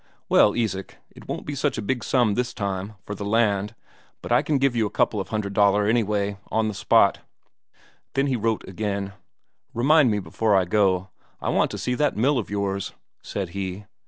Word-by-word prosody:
"Well, 105 - +5
Isak, 100 -5 -2
it - - -15
won't - - -5
be 145 - -4
such 140 -1 -1
a - - -2
big 125 +4 -2
sum 120 -5 +2
this 125 +2 -2
time, 100 -1 -3
for 105 - -5
the 100 - -6
land, 105 0 +1 0.5
but - - -6
I - - +5
can 150 - 0
give 135 -2 +1
you 110 -2 +2
a - - -7
couple 105 - +1
of - - -7
hundred 105 -2 -3
Daler 100 0 +3
anyway, 105 -2 0
on 110 0 +1
the 110 - -2
spot." - - +3 1.0
Then 135 +1 +2
he 135 -2 0
wrote 115 -1 -1
again. 100 0 -3 0.6
"Remind 140 +3 +5
me 105 - +1
before 105 +3 0
I 95 -1 +3
go, 95 -1 +1 0.3
I - - -3
want - - +2
to - - -6
see 125 - -2
that 145 0 0
mill 130 +4 +2
of 110 - -5
yours," 100 -1 -2 0.3
said 95 -3 -4
he. 95 +2 -5
105 Hz, 200 wpm, -24 LUFS, 100-120 Hz, 1.0 s, Well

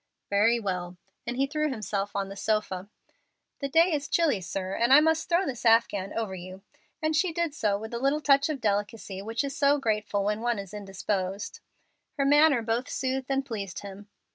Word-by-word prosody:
"Very 225 +4 +4
well;" 180 -4 -4 0.3
and 245 - -3
he 270 - +3
threw 305 +2 -1
himself 205 -5 -3
on 200 -1 -1
the 195 - -8
sofa. 200 -2 -1 0.7
"The 275 - -3
day 330 +4 +4
is 290 -1 -1
chilly, 300 - +2
sir, 185 +1 -4
and 235 +4 +1
I 275 - +10
must 320 +1 +1
throw 350 +3 +3
this 245 -6 -5
afghan 225 -4 +3
over 220 -4 -2
you;" 185 +1 -9 0.4
and 310 0 +1
she 355 +2 +2
did 335 -2 -1
so 210 -8 0
with 220 +3 -8
a 235 - -2
little 275 +4 +1
touch 280 0 +4
of 300 -3 -2
delicacy 205 -2 -2
which 225 +4 -2
is 275 0 -4
so 285 0 +4
grateful 210 -5 -1
when 210 +2 -1
one 240 -1 0
is 195 -1 -7
indisposed. 195 0 -3 0.6
Her 275 - +1
manner 290 -3 +5
both 230 +3 -1
soothed 260 0 -2
and 270 0 0
pleased 200 -8 -5
him. 200 0 -10
225 Hz, 195 wpm, -27 LUFS, 200-275 Hz, 0.7 s, I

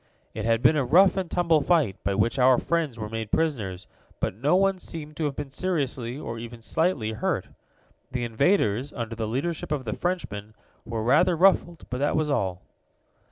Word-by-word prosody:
It 110 0 -4
had 115 0 +1
been 155 - +6
a 145 - +2
rough 180 +10 +5
and 190 -3 -2
tumble 170 -3 +2
fight, 150 - +2
by 100 - 0
which 115 +6 +1
our 130 0 +6
friends 160 -7 -1
were 110 -1 -4
made 110 0 -5
prisoners, 105 - -1 0.3
but - - -1
no 140 - +1
one 195 0 +2
seemed 155 -4 -7
to 160 - -1
have 140 -2 -2
been 145 -2 -6
seriously, 135 -8 -2
or 115 -6 -6
even 115 0 -9
slightly, 150 -7 0
hurt. 110 - -2 0.6
The 125 -2 -2
invaders, 120 - +1
under 115 -2 -5
the 110 -1 -3
leadership 145 +8 -3
of 140 -4 -1
the 105 - -2
Frenchman, 110 - -4 0.3
were 115 -1 -3
rather 160 +9 +4
ruffled, 175 -2 +3
but 125 - -2
that 145 +1 +1
was 155 -1 +1
all. 95 -9 -1
135 Hz, 190 wpm, -26 LUFS, 115-165 Hz, 0.6 s, been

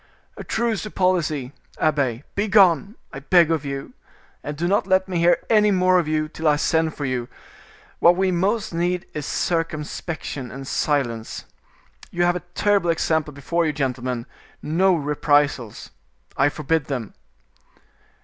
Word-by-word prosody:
"A - - -8
truce 230 -3 -1
to 215 - -6
policy, 155 -9 0 0.2
abbe; 140 -5 0
begone, 200 -1 +3 0.2
I 135 - -6
beg 170 +3 +4
of 160 -3 0
you, 140 -1 -6 0.5
and 150 0 -5
do 170 +3 -1
not 195 0 +1
let 190 0 +2
me 180 -3 -2
hear 170 +1 +4
any 210 -2 +4
more 185 -1 +3
of 165 - -2
you 155 0 0
till 160 +1 -4
I 150 - +5
send 160 +1 0
for 145 - -4
you; 125 -2 -2 0.7
what 175 +1 +6
we 190 0 +1
most 200 +4 0
need 175 +2 -1
is 150 -2 -5
circumspection 155 -4 -3
and 135 +2 -8
silence. 120 -8 -2 0.6
You 175 - -1
have 175 0 +2
a - - -2 0.2
terrible 200 -4 +2
example 160 -2 0
before 160 +5 -1
you, 155 -2 0
gentlemen: 125 -4 -2 0.3
no 180 +4 +2
reprisals, 145 -5 0 0.4
I 135 +2 +3
forbid 150 +1 -1
them." 125 -7 -4
160 Hz, 150 wpm, -22 LUFS, 140-180 Hz, 0.7 s, what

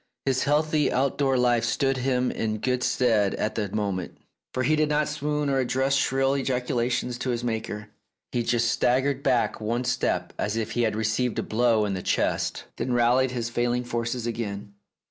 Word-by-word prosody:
His 130 -1 +1
healthy 150 +1 +2
outdoor 135 0 +1
life 120 -1 +3
stood 135 +3 +1
him 125 -1 +1
in 110 -1 -2
good 125 +3 -1
stead 125 -6 +2
at 105 - -1
that 105 -3 -3
moment, 100 -4 -2 0.3
for 130 - -1
he 155 +5 +3
did 155 0 +1
not 150 0 +1
swoon 150 0 -1
or 135 -1 +1
address 130 +2 +1
shrill 135 -1 +2
ejaculations 125 -2 -1
to 130 - -2
his 120 -1 -1
Maker. 110 -2 -3 0.4
He 120 - 0
just 120 0 +1
staggered 130 +2 +1
back 125 -5 +1
one 115 +3 -1
step, 125 0 -1
as 105 +2 -1
if 115 0 -2
he 120 - 0
had 110 -2 +1
received 110 +2 0
a - - 0
blow 115 -1 +2
in 100 - -1
the 95 - -3
chest, - - 0
then 125 - -1
rallied 120 +2 +3
his 120 -2 -3
failing 120 +1 0
forces 120 0 -3
again. 105 -4 -4
125 Hz, 185 wpm, -26 LUFS, 115-130 Hz, 0.4 s, life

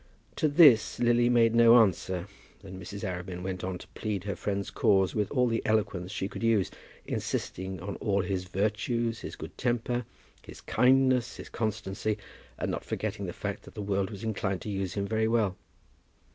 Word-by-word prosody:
To 155 - +3
this 145 -7 +6
Lily 120 0 +3
made 115 -2 +4
no 115 0 +7
answer, 95 -4 +2 0.4
and 95 -1 -9
Mrs. 100 +4 -7
Arabin 90 -1 -4
went 95 -1 -4
on 90 0 -3
to - - -13
plead 105 -4 -3
her 100 -1 -3
friend's 100 -1 -3
cause 95 -2 +3
with 105 -2 0
all 125 -3 +2
the 115 -1 0
eloquence 100 -4 0
she 95 -2 -2
could - - -8
use, 115 -4 +2 0.3
insisting 95 +1 -3
on 95 +2 -5
all 100 -2 0
his 90 0 -2
virtues, 110 +4 -1
his - - -7
good - - -9
temper, 120 0 0 0.4
his - - -12
kindness, 130 -1 +3
his - - -9
constancy, 110 -1 -2 0.4
and - - -2
not - - -3
forgetting - - -3
the - - -3
fact - - -5
that - - -15
the 105 - -4
world 100 -1 0
was 100 0 -8
inclined 100 -4 -2
to 105 - -5
use 95 -2 -3
him 100 -1 -1
very 110 +1 +1
well. 110 -4 +1
105 Hz, 185 wpm, -29 LUFS, 95-115 Hz, 0.4 s, no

